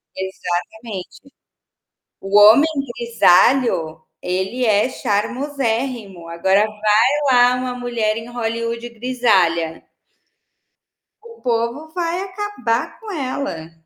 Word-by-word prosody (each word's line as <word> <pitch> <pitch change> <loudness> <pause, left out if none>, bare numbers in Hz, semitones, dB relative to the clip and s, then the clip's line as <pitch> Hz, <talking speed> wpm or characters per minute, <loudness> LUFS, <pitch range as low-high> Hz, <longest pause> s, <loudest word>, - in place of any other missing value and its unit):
Exatamente. 190 +6 -6 0.9
O 195 +1 +1
homem 220 +9 +8 0.3
grisalho, 230 -6 +3 0.2
ele 190 +8 -2
é 210 +3 +3
charmosérrimo. 235 - -3
Agora 190 +5 +2
vai 215 +3 +2 0.2
lá 245 0 +5
uma 250 0 -3
mulher 235 -3 -1
em 225 - -7
Hollywood 230 0 -3
grisalha. 205 -9 0 1.4
O 460 -1 -14
povo 235 +5 -2
vai 350 0 -2
acabar 380 - -3
com 445 - -10
ela. 260 - -4
230 Hz, 90 wpm, -19 LUFS, 200-255 Hz, 1.4 s, homem